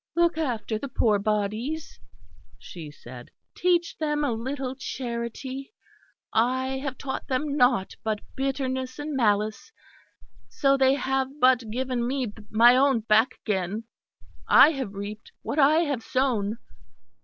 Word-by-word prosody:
"Look 340 -1 +3
after 235 -8 -2
the 280 - -5
poor 215 -5 +2
bodies," 215 +9 -2 0.6
she 165 -4 -9
said, 125 -3 -12 0.2
"teach 345 -1 +1
them 295 -1 0
a 285 - +1
little 260 +3 -3
charity; 260 - -5 0.6
I 260 +3 +1
have 265 -2 -5
taught 270 - -5
them 280 +1 -1
nought 245 -8 +2
but 215 -1 -1
bitterness 260 -1 -2
and 295 0 -4
malice, 215 - 0 0.8
so 275 -1 +2
they 265 0 +4
have 265 +1 -2
but 255 -3 +4
given 250 +1 -2
me 255 -5 -2 0.2
my 235 +3 +6
own 265 -3 +3
back 220 +4 +3
again. 200 +1 -1 0.6
I 310 - +8
have 265 -9 -5
reaped 205 +2 -7
what 300 - -2
I 300 +3 +5
have 285 -7 -1
sown." 230 -4 0
255 Hz, 130 wpm, -26 LUFS, 220-275 Hz, 0.8 s, I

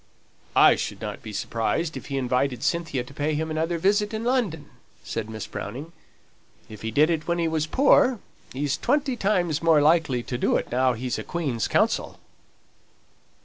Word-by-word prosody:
"I - - +7
should - - -4
not - - -6
be 110 - -8
surprised 115 +10 -2
if - - -7
he 140 - -3
invited 125 -1 0
Cynthia 165 -7 -1
to 125 - -14
pay 150 +2 -1
him 160 +1 -2
another 165 +2 -1
visit 205 +5 +1
in 220 - -3
London," 220 - -1 0.4
said 110 -1 -4
Miss 110 -2 -6
Browning. 135 +10 -7 0.8
"If 105 -2 -11
he 110 - -3
did 150 +8 +3
it 160 -2 -2
when 170 0 +1
he 170 -1 +1
was 160 -1 -1
poor, 260 - +4 0.3
he's 140 +1 -1
twenty 275 0 +1
times 180 -8 0
more 165 -2 +5
likely 150 -5 +3
to 125 0 -4
do - - +2
it - - -2
now 130 +1 +2
he's 125 +2 -3
a - - -5
Queen's 140 -10 -2
counsel." - - 0
155 Hz, 180 wpm, -25 LUFS, 125-170 Hz, 0.8 s, I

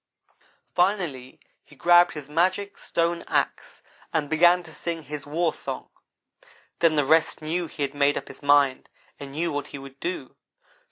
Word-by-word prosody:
Finally 175 -9 0 0.2
he 150 - -19
grabbed 175 +4 +5
his 150 -2 -7
magic 185 +6 0
stone 170 0 -1
axe, - - -2 0.3
and 155 -2 -1
began 175 +3 +5
to 160 -2 -13
sing 165 +1 -4
his 145 0 -7
warsong. 165 +2 -2 0.9
Then 165 -2 +4
the 145 -2 +2
rest 160 +1 +2
knew 170 +2 -1
he 145 - -5
had 140 0 -2
made 145 0 +2
up - - -5
his - - -12
mind 145 -2 +3 0.3
and 140 -1 -8
knew 165 +3 -1
what 145 -1 -3
he - - -8
would 135 0 -12
do. 170 -7 -4
155 Hz, 160 wpm, -25 LUFS, 145-175 Hz, 0.9 s, grabbed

